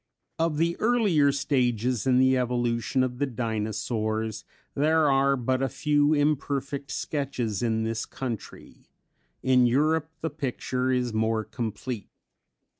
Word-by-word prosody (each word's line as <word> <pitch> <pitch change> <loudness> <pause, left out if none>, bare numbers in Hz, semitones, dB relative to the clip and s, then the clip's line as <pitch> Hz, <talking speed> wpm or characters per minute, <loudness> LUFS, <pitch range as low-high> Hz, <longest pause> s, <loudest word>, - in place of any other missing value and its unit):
Of 165 -2 +1
the 170 +2 +1
earlier 205 -12 +3
stages 125 -3 0
in 125 -1 +4
the 130 0 +4
evolution 120 0 0
of 125 -1 -3
the 145 - +1
Dinosaurs 110 -2 -2 0.3
there 155 +1 +3
are 135 0 +3
but 130 +1 0
a 135 - +1
few 145 +4 +2
imperfect 140 -1 -1
sketches 130 -8 -2
in 110 -2 0
this 110 0 -2
country; 120 -5 -7 0.6
in 130 -1 +4
Europe 155 +5 +2
the 160 - -2
picture 130 -3 -2
is 125 -2 0
more 110 0 +1
complete. 110 +1 -5
130 Hz, 125 wpm, -26 LUFS, 115-145 Hz, 0.6 s, in